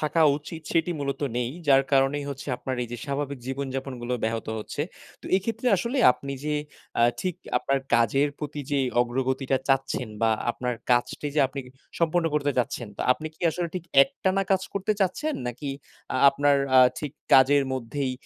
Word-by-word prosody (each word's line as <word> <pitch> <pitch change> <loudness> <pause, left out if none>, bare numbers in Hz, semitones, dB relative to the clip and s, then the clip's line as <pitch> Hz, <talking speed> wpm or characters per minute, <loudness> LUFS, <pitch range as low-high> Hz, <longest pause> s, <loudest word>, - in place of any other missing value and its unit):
থাকা 155 +2 +2
উচিত 155 +2 -8
সেটি 165 +1 +2
মূলত 140 -1 -3 0.2
নেই। 120 0 -1 0.2
যার 135 0 +6
কারণেই 135 +1 +3
হচ্ছে 140 +1 -7
আপনার 130 +1 -4
এই 120 - -5
যে 120 - -5
স্বাভাবিক 140 -1 -3
জীবনযাপনগুলো 130 -2 -3
ব্যাহত 115 0 -2
হচ্ছে। 125 +6 -4 0.4
তো - - -21
এক্ষেত্রে 225 +5 -3
আসলে 235 +9 -2
আপনি 140 +2 -7
যে 150 0 0 0.4
অ্যা 115 - +5 0.2
ঠিক 185 -3 -1 0.6
কাজের 120 +5 +3
প্রতি 150 0 -5
যে 145 - +2 0.2
অগ্রগতিটা 130 +2 0
চাচ্ছেন 135 -3 +1
বা 115 - +4 0.2
আপনার 125 0 -3 0.2
কাজটি 120 +4 +1
যে 150 - +3 0.6
সম্পূর্ণ 170 0 +2
করতে 145 -1 +1
চাচ্ছেন, 120 -2 -1
তো - - -6
আপনি 155 +4 -7
কি - - -31
আসলে 175 +1 -3
ঠিক 180 -2 -4 0.2
একটানা 190 +7 0
কাজ 190 -1 +3
করতে 200 +2 0
চাচ্ছেন? 285 - 0
নাকি 130 +4 -4 0.4
আ - - +1
আপনার 145 +1 +3 0.2
আ - - +9 0.2
ঠিক 150 -3 -5 0.2
কাজের 140 +2 +6
মধ্যেই 130 +1 -2
140 Hz, 165 wpm, -26 LUFS, 130-155 Hz, 0.6 s, আ